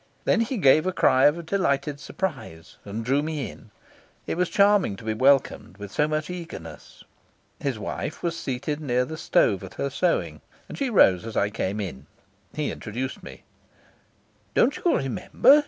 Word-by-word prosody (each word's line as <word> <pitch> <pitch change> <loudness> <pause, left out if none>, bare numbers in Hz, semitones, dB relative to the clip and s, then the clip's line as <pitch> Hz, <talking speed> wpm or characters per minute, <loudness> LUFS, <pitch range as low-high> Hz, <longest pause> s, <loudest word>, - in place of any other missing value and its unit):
Then 230 - +3
he 235 +3 -1
gave 155 0 +5
a - - +2
cry 130 -7 +4
of 165 +3 0
delighted 145 -6 0
surprise 135 - -5
and 110 +3 -5
drew 135 +4 +2
me 150 -3 -3
in. 110 - -16 0.6
It - - -2
was 180 0 0
charming 200 - +3
to 100 - -12
be 110 0 -1
welcomed 130 -6 +2
with 100 -1 -8
so 150 +9 +1
much 155 0 -2
eagerness. 165 - -9 0.6
His 135 -5 -2
wife 105 +7 -5
was 170 -1 -1
seated 140 0 -3
near 125 -3 +1
the 160 - -6
stove - - +2
at - - -10
her - - -2
sewing, - - 0 0.3
and - - -8
she 275 -2 -1
rose 95 - +5
as 115 -1 -6
I 100 +1 +1
came 100 -1 -2
in. 80 -8 -6 0.5
He 150 -1 -1
introduced 125 +5 -5
me. 65 - -11 1.1
"Don't 270 +5 +4
you 350 - +2
remember?" 235 - +4
140 Hz, 170 wpm, -25 LUFS, 110-170 Hz, 1.1 s, gave